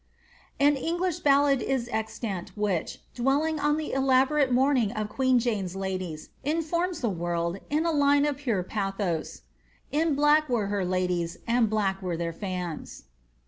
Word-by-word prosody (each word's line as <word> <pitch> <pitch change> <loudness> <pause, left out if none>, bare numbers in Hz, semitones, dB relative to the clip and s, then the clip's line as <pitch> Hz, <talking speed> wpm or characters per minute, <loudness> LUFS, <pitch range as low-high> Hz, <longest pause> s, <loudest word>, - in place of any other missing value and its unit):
'' - - -29
' - - -35
An 290 -1 +3
English 345 +4 -1
ballad 280 -3 +4
is 255 -2 -1
extant, 215 -4 -4
which, 200 -5 -1
dwelling 285 +5 +1
on 295 +1 +2
the 315 - -4
elaborate 270 +1 +3
moann 265 +2 +3
ing 215 -4 0
of 215 -2 -3
queen 260 0 +2
Jane's 210 -7 -1
ladies, 185 -5 -4
informs 330 +3 -1
the 235 - +1
world, 170 +1 -2
in 305 +3 +1
a 335 - +2
line 285 -1 +4
of 290 -2 -1
pure 235 -10 -1
bathos 195 -4 -3 0.5
In 310 0 +1
black 295 +1 +4
were 220 -5 0
her 200 -2 0
ladies, 180 -2 -1
and 235 -1 +2
black 195 -3 0
were 180 -3 -2
their 170 0 -3
fima." 180 -3 -4
240 Hz, 165 wpm, -27 LUFS, 190-290 Hz, 0.5 s, ballad